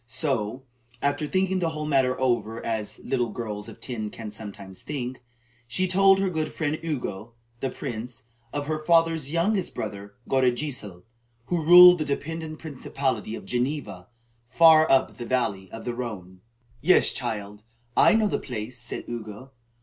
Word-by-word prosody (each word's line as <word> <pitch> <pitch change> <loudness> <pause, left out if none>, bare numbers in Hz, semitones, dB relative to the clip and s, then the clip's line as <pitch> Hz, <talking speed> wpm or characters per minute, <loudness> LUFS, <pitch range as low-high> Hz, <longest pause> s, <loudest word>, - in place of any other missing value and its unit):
So, 125 -2 -1 0.4
after 145 +2 0
thinking 190 +2 +1
the 170 -2 0
whole 155 -1 -4
matter 130 -4 +2
over, 120 -3 0
as 105 -2 -3
little 120 -3 0
girls 105 -2 -5
of - - -12
ten 110 -5 -4
can 110 0 -8
sometimes 100 -3 -9
think, 130 -4 -5 0.5
she 185 +11 0
told 195 +1 +5
her 195 0 +1
good 155 -4 -2
friend 155 -1 -2
Ugo, 120 -8 -4 0.3
the 135 - -1
priest, 115 -1 -6 0.3
of 145 0 -3
her 155 +1 -3
father's 165 -3 +3
youngest 180 +3 0
brother 100 -1 -6
Godegesil, 125 -7 -1 0.4
who 170 +1 -1
ruled 180 +2 +9
the 155 - -1
dependent 155 +2 -4
principality 130 -7 -3
of - - -9
Geneva, 125 -7 -3 0.4
far 160 +3 +6
up 135 - +3
the 120 - -6
valley 105 -7 -1
of 115 - -8
the 120 - -2
Rhone. 95 -7 -7 0.4
"Yes, 185 +5 +4
child, 105 -4 -4 0.3
I - - +6
know 220 -1 +3
the - - -1
place," 115 +3 -6
said 120 - -5
Ugo. 115 +2 -7
130 Hz, 155 wpm, -26 LUFS, 110-155 Hz, 0.5 s, ruled